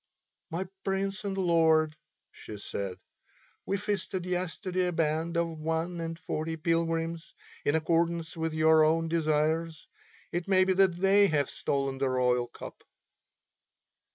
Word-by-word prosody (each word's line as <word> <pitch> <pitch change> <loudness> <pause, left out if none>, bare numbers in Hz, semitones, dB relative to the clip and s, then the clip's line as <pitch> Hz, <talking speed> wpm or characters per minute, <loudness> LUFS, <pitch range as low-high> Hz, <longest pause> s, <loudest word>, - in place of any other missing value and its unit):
"My 175 +3 -3 0.2
Prince 195 +2 -2
and 195 -1 -2
Lord," 160 -4 +3 0.4
she 105 - -9
said, 100 -2 -5 0.7
"we 200 - 0
feasted 195 -2 -3
yesterday 180 0 -1
a - - 0
band 165 +1 0
of 165 -2 -1
one 165 +2 -2
and 165 0 -4
forty 160 0 -3
pilgrims, 165 0 -1 0.3
in 145 - +2
accordance 165 +1 0
with 160 -1 -2
your 160 0 +5
own 165 +1 +2
desires. 160 0 0 0.4
It 175 +1 -3
may 190 -1 +5
be 190 0 +2
that 190 -2 +3
they 195 +3 +5
have 145 -5 0
stolen 135 -1 -2
the 135 -1 +1
royal 125 -1 +1
cup." - - -11
165 Hz, 135 wpm, -29 LUFS, 155-180 Hz, 0.7 s, your